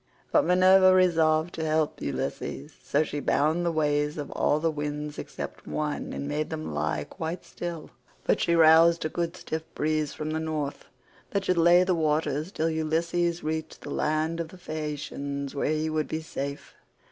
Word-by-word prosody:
But 300 - +4
Minerva 185 +1 +6
resolved 165 -3 +3
to 160 - -4
help 155 -1 0
Ulysses, 70 - -4
so 145 +2 +2
she 145 -1 -4
bound 155 +5 +1
the 170 - +1
ways 150 -1 0
of 145 - -5
all 150 - +1
the 165 +1 +1
winds 150 0 -4
except - - -7
one, 150 -1 -3
and 140 - -4
made 150 +1 -2
them 155 - -5
lie 75 0 -1
quite 160 - -6
still; 170 -2 -6 0.3
but - - +1
she 170 - +2
roused 165 +1 +6
a - - 0
good 170 +2 -3
stiff 160 -2 -4
breeze 155 -1 0
from 155 0 -4
the 160 - -1
North 155 -3 -3 0.4
that 200 -1 -1
should 180 -2 +2
lay 175 +2 +6
the 185 0 +1
waters 155 0 0
till 160 -4 0
Ulysses 170 +2 0
reached 160 0 -4
the 145 - -7
land 155 +3 0
of 165 - -2
the 185 - -13
Phaeacians 145 -3 -4
where 140 - -1
he 155 0 0
would 155 -1 -1
be 160 - -3
safe. 140 -2 -5
155 Hz, 180 wpm, -27 LUFS, 150-170 Hz, 0.4 s, Minerva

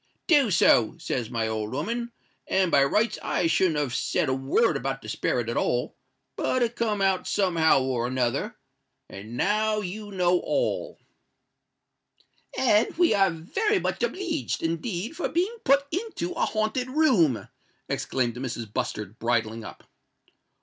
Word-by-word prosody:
_'—'Do 290 - +5
so,' 140 - +4
says 125 -8 -3
my 115 -2 -1
old 110 +1 -3
o'oman: 235 - -3 0.4
and 190 -2 +2
by 140 - +5
rights 215 +10 +1
I - - 0
shouldn't 165 0 +2
have 145 -5 -1
said 145 - 0
a - - +2
word 135 - +2
about 135 0 -3
the - - -9
sperret 120 +1 -1
at 115 - -2
all;—but 130 - -2
it 235 0 -1
come 210 -4 0
out 190 -1 +1
some 190 -4 +1
how 160 -5 +4
or 125 -2 -1
another; 125 -1 -1 0.5
and 110 +5 -9
now 215 +5 +1
you 205 +2 -6
know 180 -2 +2
all." - - -1 1.6
"And 230 -1 +2
we 350 -1 +4
are 195 -1 +4
very 190 - -1
much - - -2
obleeged, 365 - -2
indeed, 175 - -3
for 350 - -2
being 370 +7 0
put 280 +1 +4
into 360 - -3
a - - 0
haunted 220 +4 -1
room," 195 - +3 0.4
exclaimed 120 -2 -1
Mrs. 120 -4 -5
Bustard, 105 +1 -4
bridling 115 -1 -1
up. - - -10
175 Hz, 150 wpm, -26 LUFS, -, 1.6 s, Do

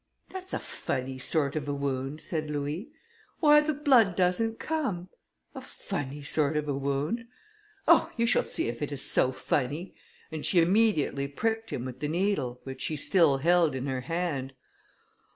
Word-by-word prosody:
"That's 375 0 -7
a - - 0
funny 130 0 -4
sort 140 +1 +1
of 145 -2 -3
a 145 - -1
wound!" 140 +1 -3
said 155 -3 -3
Louis, 150 - -3 0.5
"Why 300 -2 +7
the 305 0 -1
blood 255 -10 +4
doesn't 195 +6 +1
come!" 255 - -2 0.4
"A - - -7
funny 145 +1 -6
sort 150 +1 +1
of 150 0 -2
a 145 - 0
wound? 140 - -2 0.6
Oh! - - +5
you 235 - +2
shall 235 - +4
see - - -1
if 115 0 -5
it 145 - -2
is 140 -1 +2
so 130 - +3
funny," 145 +7 -2 0.4
and 155 -1 -5
she 180 - +3
immediately 170 -7 +2
pricked 225 +10 -2
him 125 - -4
with 130 0 -7
the 150 - -2
needle, 155 -7 -1
which 135 -1 -8
she 155 - -2
still 155 -2 +4
held 170 +1 +3
in 130 0 -3
her 130 -2 -2
hand. 140 -3 -3
150 Hz, 170 wpm, -28 LUFS, 140-195 Hz, 0.6 s, Why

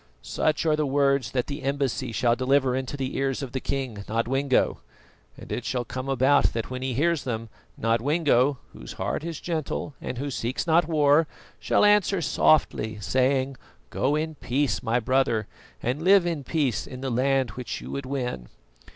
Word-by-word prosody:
"Such 155 +1 0
are 155 -1 +3
the 155 - 0
words 140 -3 +2
that 125 0 -1
the 145 +1 -6
embassy 135 -2 -1
shall 120 +1 +2
deliver 130 0 +2
into 130 +2 -3
the 135 -1 -3
ears 135 0 -1
of 130 - -6
the 130 - -2
king, 130 -7 -4
Nodwengo, 130 +4 +1 0.6
and - - -11
it 120 - -2
shall 125 0 -2
come 130 +4 -5
about 135 +2 +3
that 115 +2 -4
when 130 0 -4
he 130 -2 -2
hears 165 +3 +1
them, 115 -3 -4 0.3
Nodwengo, 130 +3 +2 0.2
whose - - -9
heart - - -3
is 165 -2 -5
gentle 155 -3 -3
and 125 - -5
who 140 +2 -3
seeks 120 +1 -2
not 165 0 +3
war, 150 -1 +4 0.3
shall - - +3
answer 205 -2 +4
softly, 140 -8 +2
saying: 130 +4 +1 0.3
"'Go 140 +3 +1
in 160 +1 -2
peace, 140 0 -1
my 120 0 +1
brother, 125 -2 +1 0.4
and 130 +6 -1
live 190 +1 +5
in 165 -5 -2
peace 140 -6 -1
in 130 0 -8
that 135 -1 -2
land 130 +1 +1
which 125 -1 -5
you - - -8
would 140 -1 -4
win. 125 - -3
135 Hz, 175 wpm, -26 LUFS, 125-145 Hz, 0.6 s, live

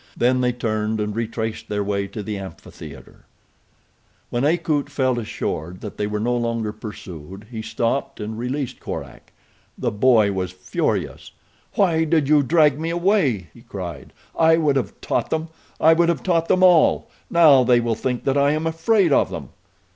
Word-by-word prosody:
Then 125 +1 +2
they 125 0 +2
turned 110 -2 -2
and 105 0 -2
retraced 110 -1 -4
their 105 -1 -1
way 100 0 -2
to 105 +2 -7
the 105 +1 -4
amphitheater. 95 -1 -11 1.1
When 120 +1 -1
Akut 155 -2 +1
felt 130 -3 0
assured 90 -5 -4
that 105 - -8
they 105 - -1
were 105 0 -3
no 120 +3 0
longer 115 -2 -1
pursued 95 -3 -9
he 110 -2 -5
stopped 115 +4 -2
and 110 +1 -5
released 125 +3 -4
Korak. - - -8 0.5
The - - -1
boy 110 -1 +4
was 95 -2 -2
furious. 95 0 -3 0.4
"Why 170 -5 +3
did 155 -3 +1
you 150 0 +5
drag 150 0 +3
me 165 +1 -2
away?" 170 - +1
he - - -16
cried. 85 - -8 0.2
"I 160 0 +4
would 150 -4 +2
have 135 - -2
taught - - -1
them! 160 0 -2 0.3
I 160 +1 +6
would 170 +1 +3
have 170 -6 -1
taught 165 -3 +1
them 185 - +3
all! 175 -4 +5 0.2
Now 155 -6 +6
they 125 -1 +4
will 115 -1 0
think 125 +2 -3
that 135 +1 +1
I 140 +1 +3
am 155 +1 -2
afraid 165 +2 +2
of - - +3
them." - - -7
125 Hz, 175 wpm, -22 LUFS, 105-160 Hz, 1.1 s, I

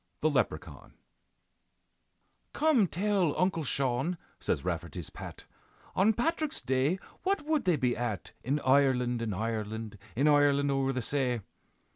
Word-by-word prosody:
THE - - +3
LEPRECHAUN - - -2 1.6
"Come 290 -10 +3
tell, 185 -3 +1
Uncle 180 -3 +1
Shaun," 135 +5 0 0.2
says - - -1
Rafferty's - - -4
Pat, - - -9 0.5
"On 200 +4 +5
Patrick's 310 +6 0
Day 130 +7 +1 0.2
what 385 -4 0
would 310 -5 +1
they 180 -3 +4
be 125 -4 +1
at 105 -7 -3
In 140 +5 0
Ireland, 130 -3 +3
in 115 -2 -2
Ireland, 110 0 -3 0.2
In 140 +6 +3
Ireland 145 -1 +4
o'er 135 -1 +1
the 130 -2 -2
say? 125 -3 0
140 Hz, 130 wpm, -30 LUFS, 120-185 Hz, 1.6 s, On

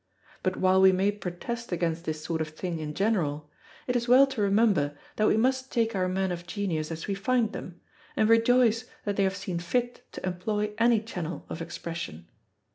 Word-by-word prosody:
But 185 0 -1
while 190 0 +4
we 190 0 +8
may 190 +2 +2
protest 205 +4 -6
against 170 -1 -1
this 155 -1 -3
sort 160 -1 -2
of 160 - -1
thing 165 +2 -5
in 150 -1 -5
general, 155 -8 0 0.3
it 250 - -1
is 240 0 0
well 255 +3 +8
to 270 -5 -4
remember 200 -8 +2 0.2
that 215 - +3
we - - +3
must 260 +3 +1
take 230 -2 +1
our 185 -1 +1
men 190 0 0
of 175 0 -5
genius 175 -6 -2
as 165 -1 -5
we 200 - -1
find 225 +3 +1
them, 175 -1 -8 0.4
and 215 - +3
rejoice 230 +1 +4 0.2
that 205 -1 -1
they 200 - +2
have 195 0 0
seen 185 -3 -3
fit 240 +8 -2
to - - -6
employ 210 +4 -2
any 230 -1 +4
channel 180 -6 -5
of 165 - -5
expression. 165 - -6
195 Hz, 200 wpm, -28 LUFS, 170-225 Hz, 0.4 s, we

